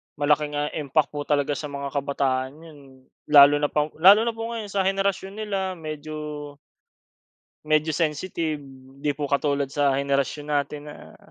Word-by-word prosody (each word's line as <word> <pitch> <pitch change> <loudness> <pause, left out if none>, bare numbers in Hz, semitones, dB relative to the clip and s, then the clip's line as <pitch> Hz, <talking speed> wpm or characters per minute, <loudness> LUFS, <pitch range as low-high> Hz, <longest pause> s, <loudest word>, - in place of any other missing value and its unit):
malaking, 150 0 +1
ah, 145 0 -1
impact 150 0 0
po 145 -1 -4
talaga 145 0 +1
sa 150 - -5
mga 140 -1 -5
kabataan 135 -2 -1
yun. 160 -3 -13 0.5
Lalo 145 -1 +8
na 145 - +1
pang 150 0 0
lalo 200 +6 +8
na 235 - 0
po 225 0 -4
ngayon 220 -3 -5
sa 195 -1 +1
henerasyon 195 0 -1
nila 195 -3 -2
medyo 150 -2 -7 1.1
medyo 155 0 +1
sensitive. 160 -1 -2 0.4
'Di 145 -1 -1
po 145 - -3
katulad 140 0 0
sa 140 -2 +2
henerasyon 140 +1 -1
natin 145 0 -2
na, 150 - -12
150 Hz, 155 wpm, -24 LUFS, 145-165 Hz, 1.1 s, Lalo